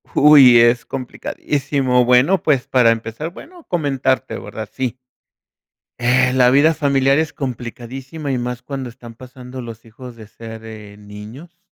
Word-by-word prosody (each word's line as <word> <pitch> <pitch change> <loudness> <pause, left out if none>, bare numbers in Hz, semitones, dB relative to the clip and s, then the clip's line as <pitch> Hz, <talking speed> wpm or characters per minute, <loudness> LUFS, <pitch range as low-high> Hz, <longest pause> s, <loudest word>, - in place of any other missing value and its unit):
Uy, 140 -5 +7
es 120 +1 +3
complicadísimo. 135 0 -2
Bueno, 130 +9 +3
pues 140 -5 0
para 125 -3 +4
empezar, 115 +7 -4
bueno, 345 - -14
comentarte, 135 -5 -1
¿verdad? 110 -2 -8
Sí. 130 -2 -4 1.1
Eh, 125 +1 +3
la 125 -1 +4
vida 145 +5 +4
familiar 140 -2 +1
es 160 -2 -2
complicadísima 130 +3 -6
y 130 - -1
más 125 0 -4
cuando 135 0 -6
están 120 -1 -12
pasando 125 +1 -10
los 115 -2 -10
hijos 120 +2 -12
de 110 -2 -13
ser, 110 +1 -11
eh, 105 -2 -11
niños 110 +12 -12
125 Hz, 145 wpm, -18 LUFS, 120-140 Hz, 1.1 s, Uy